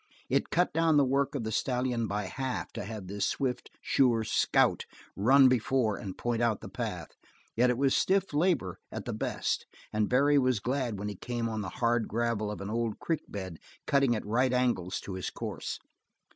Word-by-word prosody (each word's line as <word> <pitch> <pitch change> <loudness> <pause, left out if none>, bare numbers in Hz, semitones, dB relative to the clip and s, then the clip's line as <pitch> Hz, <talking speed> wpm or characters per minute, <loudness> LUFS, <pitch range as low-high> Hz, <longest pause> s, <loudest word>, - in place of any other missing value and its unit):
It - - +2
cut 180 +1 +1
down 165 -1 +3
the 140 - +5
work 140 +2 +1
of 130 - -2
the 110 - -3
stallion 125 -1 0
by 105 +1 -2
half 130 +7 -4
to 100 - -5
have 105 -2 -6
this 100 +2 -3
swift, 130 -3 -2
sure 120 -4 +3
scout - - +2 0.3
run 130 +6 +6
before 125 -3 +2
and 100 -5 -7
point 120 -1 -1
out 115 -3 +1
the - - -8
path, - - -4 0.5
yet 125 +2 +4
it 125 - +1
was 135 0 +2
stiff 195 -3 +2
labor 145 - +1
at - - -6
the - - -3
best - - -2 0.3
and 105 -1 +1
Barry 140 +3 +4
was 130 -4 +2
glad 125 -1 -1
when 100 +1 -4
he 105 - -3
came 120 +3 -3
on 110 -1 -3
the 95 - -4
hard 115 +3 0
gravel 115 -1 -1
of 105 - -5
an 100 - -5
old 115 -1 -1
creek 165 -3 -2
bed 95 -5 -6 0.3
cutting 140 -4 +3
at 110 - -4
right 125 +5 +2
angels 120 -8 0
to 100 - -7
his 95 -1 -3
course. - - -5
120 Hz, 200 wpm, -30 LUFS, 105-135 Hz, 0.5 s, run